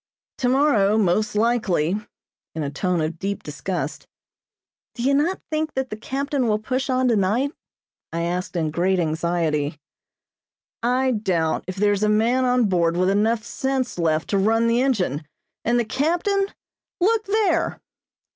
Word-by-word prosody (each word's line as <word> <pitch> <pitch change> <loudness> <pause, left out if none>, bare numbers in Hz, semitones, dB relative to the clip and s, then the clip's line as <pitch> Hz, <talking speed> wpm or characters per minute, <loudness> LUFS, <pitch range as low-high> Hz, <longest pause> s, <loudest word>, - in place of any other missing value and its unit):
"Tomorrow, 245 -6 +3
most 210 +1 +1
likely," 210 -7 +1 0.6
in 160 - -2
a 140 - -3
tone 180 +3 0
of 155 +1 -3
deep 200 0 -3
disgust. 150 +1 -4 0.9
"Do 235 - -4
you 275 +2 +3
not 315 +7 +1
think 310 0 -1
that 265 -1 -2
the - - -2
captain 270 +3 -2
will 210 -1 +2
push 255 +5 -2
on 255 0 +2
tonight?" 230 +5 +2 0.6
I 170 0 -2
asked 180 +2 -3
in 160 -3 0
great 185 +4 +1
anxiety. 160 -2 0 1.0
"I 255 +2 +2
doubt 185 -8 0
if 185 - -4
there 205 +1 +2
is 200 - -2
a 210 - +3
man 235 +5 +2
on 250 -1 +3
board 170 -3 +1
with 185 +1 +3
enough 220 +2 +1
sense 260 -2 -2
left 160 -1 +1
to 200 - +2
run 225 +3 +3
the 235 +1 +3
engine, 190 - 0 0.4
and 240 +1 +2
the 235 - 0
captain 350 - +1 0.5
look 440 +4 +2
there!" 420 +1 +1
215 Hz, 155 wpm, -23 LUFS, 175-260 Hz, 1.0 s, Tomorrow